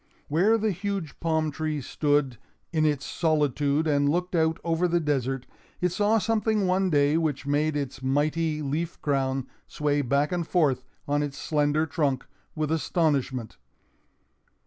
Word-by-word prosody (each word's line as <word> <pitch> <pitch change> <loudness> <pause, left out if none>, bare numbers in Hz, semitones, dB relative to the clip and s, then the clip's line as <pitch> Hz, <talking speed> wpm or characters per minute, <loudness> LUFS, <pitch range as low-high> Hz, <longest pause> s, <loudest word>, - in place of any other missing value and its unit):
Where 190 +10 +4
the 220 -1 0
huge 195 -4 -4
palm 160 -1 0
tree 155 0 -2
stood 145 -3 0 0.3
in 155 -1 +3
its 145 -2 -1
solitude 150 -2 +1
and 145 -2 +2
looked 180 +4 -1
out 160 -1 +2
over 170 +1 +1
the 175 0 +2
desert, 135 -4 -1 0.3
it 180 - +2
saw 210 +4 +2
something 215 -1 +1
one 185 +1 +2
day 145 -1 +3
which 145 -4 -1
made 150 +1 +1
its 135 -2 -4
mighty 150 +3 0
leaf 155 +4 -3
crown 135 -2 0 0.2
sway 145 -1 0
back 140 +3 +1
and 175 -2 -1
forth 140 -8 +2 0.2
on 145 +1 +1
its 145 -2 -3
slender 150 0 +1
trunk 145 -4 -1 0.3
with 155 -1 -1
astonishment. 140 - 0
150 Hz, 145 wpm, -26 LUFS, 140-165 Hz, 0.3 s, Where